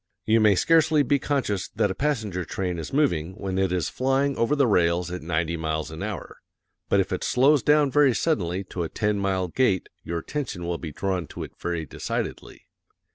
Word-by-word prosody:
You 110 +1 +4
may 105 -2 +5
scarcely 160 - +4
be 140 +1 +2
conscious 125 -9 -1
that 100 - +2
a - - -1
passenger 110 -7 -1
train 90 -1 -3
is 80 - -6
moving 90 - +1
when 95 -1 -3
it 95 -2 +1
is 90 -4 0
flying 135 +2 0
over 115 +6 +1
the 140 -2 +3
rails 90 -4 +2
at 90 - -5
ninety 85 0 -1
miles 80 -2 -3
an 80 - -7
hour, 100 -3 -5 0.5
but 100 - +4
if 95 0 0
it 95 - -2
slows 140 +3 +4
down 150 -2 +3
very 140 -4 +4
suddenly 95 - 0
to 90 - -3
a 80 - -2
ten 105 -1 0
mile 95 -2 0
gait 95 0 +1
your 85 - -3
attention 100 - -4
will 85 -1 -2
be 80 - -6
drawn 90 +1 -2
to - - -7
it - - -8
very 85 -2 -2
decidedly. - - -5
95 Hz, 200 wpm, -25 LUFS, 85-135 Hz, 0.5 s, may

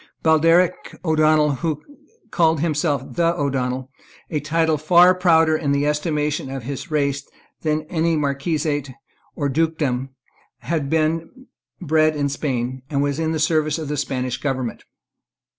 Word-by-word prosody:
Baldearg 165 +3 +4 0.3
O'Donnel, 155 -2 +3
who 155 -1 -3 0.5
called 160 -3 +2
himself 150 -3 0
the 170 0 +1
O'Donnel, 130 -2 -2 0.4
a 155 - 0
title 160 +1 +1
far 175 +4 +6
prouder, 165 -3 +3
in 145 -3 0
the 140 +1 +1
estimation 150 -2 -1
of 135 -2 -5
his 140 +7 -6
race, 140 -2 0 0.4
than 155 -1 0
any 165 +1 0
marquisate 145 0 -1 0.4
or 145 - -1
dukedom, 140 -3 -1 0.5
had 155 -5 -2
been 165 - -1 0.3
bred 155 0 +2
in 145 -1 0
Spain, 130 -3 -3
and 140 -2 0
was 145 +1 -1
in 160 0 0
the 160 - -1
service 155 0 +1
of 155 -3 -5
the 150 - -1
Spanish 130 -3 -2
government. 130 -5 -3
150 Hz, 140 wpm, -21 LUFS, 140-160 Hz, 0.5 s, far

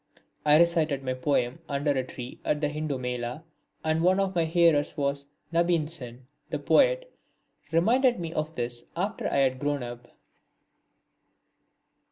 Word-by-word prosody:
I 150 0 +7
recited 160 -4 +2
my 130 -1 -1
poem 130 0 0
under 145 +1 0
a 130 -2 0
tree 125 -1 -9
at 150 - 0
the 150 -1 0
Hindu 150 -2 -3
Mela 125 +3 -4 0.4
and 160 0 +1
one 185 +3 +4
of 195 -1 0
my 170 -2 +2
hearers 165 -3 +3
was 140 0 -1 0.3
Nabin 170 -2 +2
Sen, 125 -6 -7 0.2
the - - -2
poet. - - +3 0.6
He 160 - -5
reminded 240 +7 +3
me 165 -1 -4
of 155 +1 -3
this 120 0 -3
after 200 +5 -1
I - - -2
had 130 -2 +2
grown 145 -1 -1
up. 120 0 -8
150 Hz, 155 wpm, -27 LUFS, 130-170 Hz, 0.6 s, I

